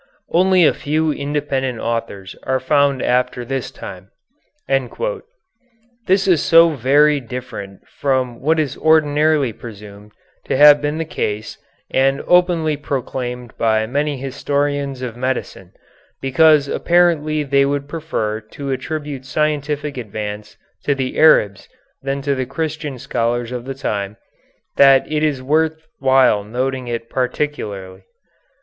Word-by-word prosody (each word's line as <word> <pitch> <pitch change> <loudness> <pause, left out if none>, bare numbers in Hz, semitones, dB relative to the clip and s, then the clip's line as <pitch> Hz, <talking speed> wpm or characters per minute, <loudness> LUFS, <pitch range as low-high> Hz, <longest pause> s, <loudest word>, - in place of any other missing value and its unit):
Only 185 0 +4
a - - +4
few 155 +2 0
independent 140 -3 -2
authors 115 -5 -4
are 130 0 -1
found 140 0 +2
after 125 0 0
this 135 0 -3
time." 95 0 -10 0.6
This 235 - -3
is 175 -5 +4
so 165 0 +6
very 145 +2 +3
different 120 -6 -8
from 130 -4 -2
what 160 +4 +2
is 145 -4 -1
ordinarily 150 -4 +3
presumed 105 -2 -12 0.3
to - - -1
have 145 0 +8
been 150 +1 -2
the 165 - -2
case 110 -7 -4 0.3
and 135 +1 +2
openly 175 -4 +3
proclaimed 125 -4 -4
by 110 -1 +2
many 145 +4 -1
historians 140 0 -2
of 120 -3 -5
medicine 125 -7 -4 0.5
because 145 +2 +4
apparently 155 -3 +2
they 140 -1 +3
would 140 0 -1
prefer 145 -9 -3
to 135 +6 -7
attribute 145 0 -4
scientific 150 0 -2
advance 105 -2 -6 0.3
to 145 - +1
the 130 -1 -3
Arabs 105 -11 +4 0.3
than 135 0 -3
to 140 0 +1
the 130 -2 -3
Christian 150 0 -4
scholars 120 0 -2
of 125 -1 -5
the 135 0 -5
time, 105 -6 -3 0.6
that 135 -1 +6
it 150 -1 0
is 145 -4 0
worth 160 +3 0
while 130 -6 +4
noting 125 +4 -3
it 115 -1 -4
particularly. 105 -8 -3
135 Hz, 130 wpm, -19 LUFS, 120-150 Hz, 0.6 s, have